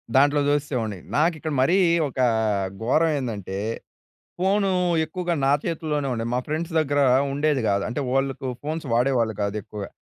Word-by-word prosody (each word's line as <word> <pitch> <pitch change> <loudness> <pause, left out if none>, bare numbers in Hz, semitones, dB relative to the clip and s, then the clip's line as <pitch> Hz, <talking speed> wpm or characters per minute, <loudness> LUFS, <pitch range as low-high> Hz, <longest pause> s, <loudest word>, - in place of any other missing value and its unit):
దాంట్లో 145 +2 +4
చూసేసేవాడిని. 125 -9 -1 0.2
నాకిక్కడ 155 0 +1
మరీ 175 +8 +3 0.3
ఒక 135 - -8 0.6
ఘోరం 160 +7 +3
ఏందంటే? 105 -7 -4 0.8
ఫోను 195 +1 +2 0.3
ఎక్కువగా 175 +1 -2
నా - - +4
చేతుల్లోనే 155 -4 -2
ఉండేది. 115 0 -3
మా - - +2
ఫ్రెండ్స్ 160 +3 -3
దగ్గర 145 -2 +1 0.3
ఉండేది 145 0 +1
కాదు. 100 0 +1
అంటే 125 +4 -3
వాళ్ళకు 135 0 -1 0.2
ఫోన్స్ 155 +2 -4
వాడేవాళ్ళు 120 -2 +2
కాదు 100 +1 -2
ఎక్కువగా. 105 0 -7
145 Hz, 140 wpm, -24 LUFS, 120-155 Hz, 0.8 s, దాంట్లో